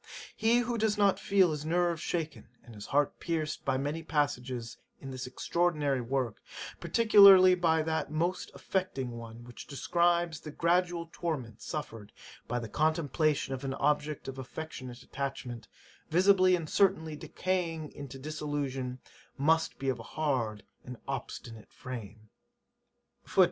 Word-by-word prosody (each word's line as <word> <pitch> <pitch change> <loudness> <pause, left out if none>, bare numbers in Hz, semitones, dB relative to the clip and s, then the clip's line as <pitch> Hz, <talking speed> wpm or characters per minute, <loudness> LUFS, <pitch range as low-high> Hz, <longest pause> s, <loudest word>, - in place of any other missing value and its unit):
He 225 +2 +3
who 240 -1 -2
does 215 -1 +1
not 200 -2 +3
feel 190 -4 +3
his 150 -1 -3
nerves 170 0 +1
shaken, 160 -7 -3 0.2
and 120 - -13
his 105 -1 -9
heart 145 0 +1
pierced 160 -2 -2
by 135 -1 +1
many 145 +4 -2
passages 130 -6 -2 0.2
in 135 - -8
this 130 -1 -5
extraordinary 150 -3 0
work, 125 -2 -2 0.4
particularly 200 -5 +8
by 165 -3 +2
that 160 0 -1
most 170 +4 -1
affecting 180 -10 -2
one, 115 0 -9
which 120 0 -11
describes 170 +2 +1
the 155 - -9
gradual 170 +2 +1
torment 130 -10 -4
suffered 115 -9 -6 0.4
by 120 - -1
the 115 -1 -4
contemplation 155 +1 +1
of 130 +1 -5
an 135 0 -2
object 150 +1 0
of 135 0 -6
affectionate 130 -2 -7
attachment, 125 -4 -5 0.4
visibly 185 +2 +5
and 165 -3 -4
certainly 160 -4 +2
decaying 165 -2 -2
into 140 -2 -8
dissolution, 140 -3 -3 0.4
must 160 +3 +2
be 135 - -4
of 130 -3 0
a 115 - -11
hard 125 -9 0 0.2
and 125 -1 -8
obstinate 120 -4 -6
frame. 110 -4 -8
150 Hz, 140 wpm, -30 LUFS, 130-170 Hz, 0.4 s, particularly